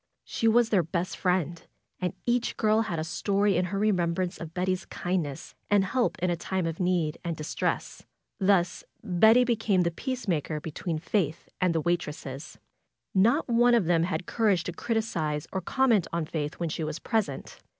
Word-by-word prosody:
She 225 - -1
was 230 +1 +4
their 200 -5 +4
best 170 +2 -3
friend, 175 -3 0 0.4
and 180 -2 -2
each 245 0 0
girl 215 0 +3
had 205 -7 -2
a 155 - -1
story 200 +4 +1
in 180 +1 +2
her 190 +2 -3
remembrance 185 -3 0
of 165 -1 -7
Betty's 185 0 -1
kindness 175 -7 -3 0.2
and 205 -2 +4
help 240 0 0
in 180 - +2
a - - +1
time 185 +1 -2
of 165 -1 -3
need 175 -4 0
and 170 -2 -3
dis 155 - -5
tress. - - -2 0.4
Thus 190 -3 +2 0.2
Betty 220 +5 +5
became 225 -6 +2
the 170 -1 +1
peacemaker 170 - -2
between 160 +2 -4
Faith 160 -1 -1
and 180 -2 +2
the 160 - +2
waitresses. 150 -4 -3 0.6
Not 230 +11 +3
one 240 0 +4
of 225 -7 +2
them 170 -1 +3
had 180 +1 -1
cour 225 -2 +1
age 180 -4 +2
to 175 - -4
criticize 170 -9 -1
or 190 - -1
comment 230 -2 +2
on 170 -1 -1
Faith 150 -1 -3
when 170 -2 -3
she 160 - -3
was 155 0 -3
pres 220 -1 0
ent. 135 - -9
180 Hz, 185 wpm, -28 LUFS, 165-215 Hz, 0.6 s, Betty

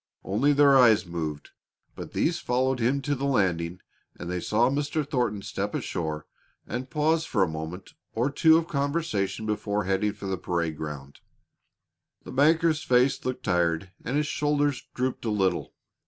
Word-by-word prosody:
Only 115 +10 +2
their 140 -1 +5
eyes 115 -6 +6
moved, 80 -4 -5 0.4
but - - -8
these 165 - +1
followed 130 +1 0
him 130 +4 +1
to 145 - 0
the 140 0 -2
landing 90 -8 0 0.3
and 85 - -6
they 90 - -1
saw 110 +6 +2
Mr. 145 +2 -1
Thornton 120 -8 -1
step 100 +1 -3
ashore 80 -3 -3 0.4
and 125 +2 -5
pause 155 +4 +1
for 105 -11 +1
a - - +1
moment 80 +4 -7 0.2
or 125 +5 0
two 160 +3 +5
of 165 0 -1
conversation 140 - -1
before 105 -1 -1
heading 95 +2 0
for 100 -1 -10
the 95 -1 -2
parade 85 -3 -1
ground. 75 -2 -7 1.0
The - - -9
banker's 155 +3 +3
face 125 +2 +2
looked 130 0 -3
tired 90 -1 0
and 130 +4 -1
his 150 - +1
shoulders 145 -2 0
drooped 130 0 -2
a 115 - -1
little. 95 -4 0
115 Hz, 165 wpm, -26 LUFS, 90-140 Hz, 1.0 s, eyes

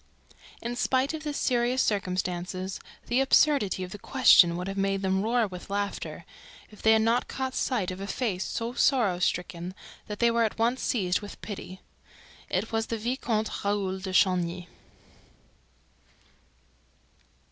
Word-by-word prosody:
In 240 +1 -3
spite 260 +4 +1
of 315 - -5
the 300 -1 -3
seriousness 250 -2 +1
of - - 0
the - - +3
circumstances, 185 0 -3 0.3
the 245 +3 +2
absurdity 270 -8 +3
of 180 - -7
the 205 - -8
question 190 -9 +5
would 180 +1 -4
have 195 - -4
made 195 0 0
them 190 0 +1
roar 230 +2 +2
with 185 -2 -9
laughter, 200 0 -3 0.5
if 210 - -14
they 220 - +5
had 220 0 +4
not 230 +2 +2
caught 260 -1 -3
sight 215 -11 -1
of 185 +1 -7
a 200 - -4
face 205 -6 -1
so 230 +1 -3
sorrow 230 -9 +2
stricken 180 0 -2 0.3
that 210 - -5
they 235 +1 +3
were 230 0 +2
at 220 - -1
once 235 +3 +1
seized 190 -6 0
with 205 - -9
pity. 190 -3 -7 0.7
It 190 +5 -1
was 225 0 -1
the 230 - -2
Vicomte 225 -2 -2
Raoul 200 -2 -1
de 190 0 -5
Chagny. 180 -2 +1
205 Hz, 160 wpm, -27 LUFS, 185-240 Hz, 0.7 s, question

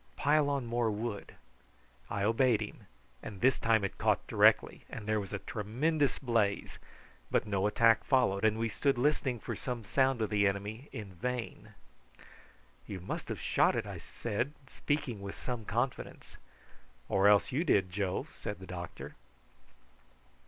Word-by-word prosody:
"Pile 145 - +3
on 140 -3 -1
more 120 0 0
wood." 105 0 -4 0.7
I 100 -1 -2
obeyed 115 +1 +3
him, 105 -1 -7 0.3
and 100 -3 -8
this 130 +3 +3
time 110 -2 +3
it 100 - -4
caught - - +2
directly - - +3
and 110 - -7
there 110 0 +1
was 100 -2 -6
a 100 - -2
tremendous 130 +10 0
blaze, 115 -6 0 0.5
but - - +1
no 100 -1 +1
attack 115 +1 +4
followed; 110 -7 +2
and 110 0 +3
we 115 0 0
stood 135 +4 0
listening 130 -2 +1
for - - -5
some 125 -3 -4
sound 130 +3 +2
of 110 - -2
the 100 -1 +3
enemy 105 +7 -4
in 100 -4 -7
vain. 125 +6 -5 1.1
"You 100 -3 -5
must 90 - -5
have - - -4
shot - - +2
it," - - -1
I - - -7
said, 120 +5 -3
speaking 135 -6 -2
with 100 0 -7
some 120 -4 -4
confidence. 120 +5 -3 0.7
"Or 95 +1 +3
else 105 -1 +5
you 145 +6 +1
did, 95 - +2
Joe," 95 -1 -1
said 105 - -5
the 95 - -10
doctor. 90 -1 -7
110 Hz, 160 wpm, -32 LUFS, 100-125 Hz, 1.1 s, else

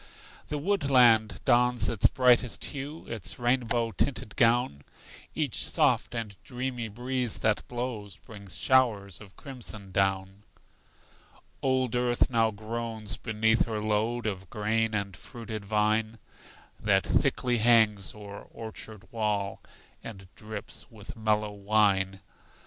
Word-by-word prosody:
The 150 - -3
woodland 135 - +4
dons 125 -1 +3
its 110 - +3
brightest 125 -2 +3
hue, 145 +3 -6
Its 100 -4 -5
rainbow 120 -2 +1
tinted 110 +1 -1
gown; 115 - +3 0.5
Each - - -1
soft - - +2
and 110 -4 -4
dreamy 125 -2 -3
breeze 125 +2 -2
that 110 -1 +1
blows 120 -6 -4
Brings 100 -6 -9
showers 110 -8 +2
of 100 -2 -14
crimson 115 -8 -8
down. 95 0 0 1.2
Old 130 -3 +1
earth 120 +1 +2
now 115 -2 +3
groans 110 +1 -5
beneath 110 0 +1
her 110 -2 -2
load 110 +3 0
Of 95 -4 -3
grain 110 +1 0
and 100 -3 -2
fruited 110 -3 -8
vine, 110 +2 +1 0.6
That - - +2
thickly 120 -2 +1
hangs 110 -5 +4
o'er 100 -1 -9
orchard 110 -1 -8
wall, 105 -3 -1 0.4
And 95 -4 -9
drips 110 -1 -7
with 110 0 -11
mellow 105 -1 0
wine. 100 -2 +1
110 Hz, 120 wpm, -28 LUFS, 105-120 Hz, 1.2 s, woodland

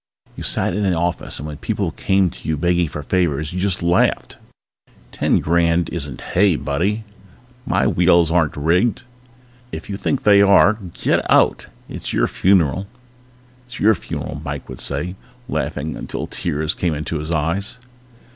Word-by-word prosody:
You - - -8
sat 90 - +1
in 105 - -1
an 95 -3 +1
office 85 +1 -2
and 75 - -6
when 75 -1 -7
people - - -2
came 95 -2 +1
to 90 - -8
you 80 - 0
begging 85 +2 +1
for 75 0 -6
favors 80 -2 0
you 90 - -3
just 95 -2 0
laughed. 85 +1 +1 0.7
Ten - - +1
grand 85 0 +1
isn't 75 -6 -5
hay, 95 -2 +4
buddy! 85 +11 -1 0.6
My - - +2
wheels 85 -2 +4
aren't 85 -4 +1
rigged. 90 - +1 0.7
If 80 +5 -7
you 100 - -3
think 135 - -1
they 100 -1 +6
are 100 +1 +6 0.2
get - - +1
out. - - +3 0.2
It's - - -6
your - - +2
funeral. 95 -1 +2 0.8
It's 125 - -9
your 110 +2 +5
funeral, 95 - -6
Mike - - -5
would - - -7
say, 80 +6 -2 0.3
laughing 80 - -3
until - - -5
tears 80 -2 -2
came 85 -4 -1
into 75 +1 -3
his 75 +1 -6
eyes. 85 +8 -1
85 Hz, 160 wpm, -20 LUFS, 75-95 Hz, 0.8 s, they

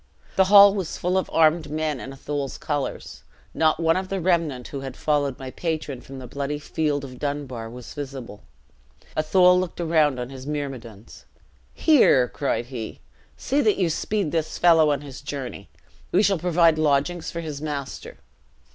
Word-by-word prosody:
The 190 - +5
hall 200 0 +8
was 190 -5 -4
full 180 +1 -1
of 190 - 0
armed 160 0 +3
men 155 -2 -2
in 135 - -7
Athol's 140 0 -4
colors. 145 -3 -4 0.3
Not 155 0 +2
one 165 0 +3
of 185 0 -3
the 195 - -2
remnant 165 -8 0
who 140 - -5
had 135 -1 -7
followed 145 -3 0
my 130 -1 -7
patron 155 -6 -3
from 135 - -10
the 130 - -8
bloody 140 +3 -3
field 145 -1 -2
of 130 -2 -9
Dunbar 140 -6 -4
was 120 0 -10
visible. 135 -7 -7 0.7
Athol 180 +4 +4
looked 185 -1 -4
round 155 -5 +2
on 125 +1 -5
his 135 0 -9
myrmidons: 130 -8 -6 0.5
'Here,' 240 - +5
cried 135 -2 -2
he, 120 -3 -7 0.4
'see 280 +3 0
that 215 -5 +2
you 175 -4 +1
speed 200 0 -1
this 160 -2 -2
fellow 165 -3 +5
on 145 -2 0
his 140 -2 -10
journey. 140 -3 -6 0.4
We 195 - +4
shall 195 -3 +2
provide 170 -2 +3
lodgings 155 +3 +1
for 170 - -5
his 150 -3 -6
master.' 145 -3 -5
150 Hz, 170 wpm, -24 LUFS, 135-170 Hz, 0.7 s, hall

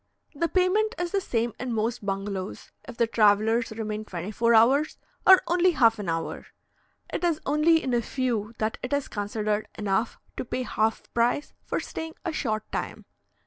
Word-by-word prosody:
The 335 +3 0
payment 415 +5 +2
is 350 -1 -2
the 395 - +1
same 235 - -1
in 250 -1 -3
most 225 +1 -1
bungalows, 195 -1 -4 0.2
if 245 -2 -9
the 235 - +4
travellers 220 +1 +3
remain 215 -1 -4
twenty 185 -1 -6
four 230 +2 +3
hours 265 +7 +4 0.3
or 380 -1 +9
only 350 +1 +3
half 230 -6 +4
an 195 -4 -3
hour; 165 0 -3 0.7
it - - -2
is 335 -3 +2
only 310 +3 +3
in 255 - -1
a 240 - +3
few 235 -3 -2
that 215 0 -2
it 250 - -4
is 285 -1 0
considered 210 0 -2
enough 210 +2 0 0.2
to - - -2
pay 255 +1 -2
half 220 -2 -1
price 240 +5 +1
for - - -2
staying 320 0 -6
a 335 - -1
short 215 -8 -1
time. - - -4
235 Hz, 180 wpm, -26 LUFS, 215-300 Hz, 0.7 s, or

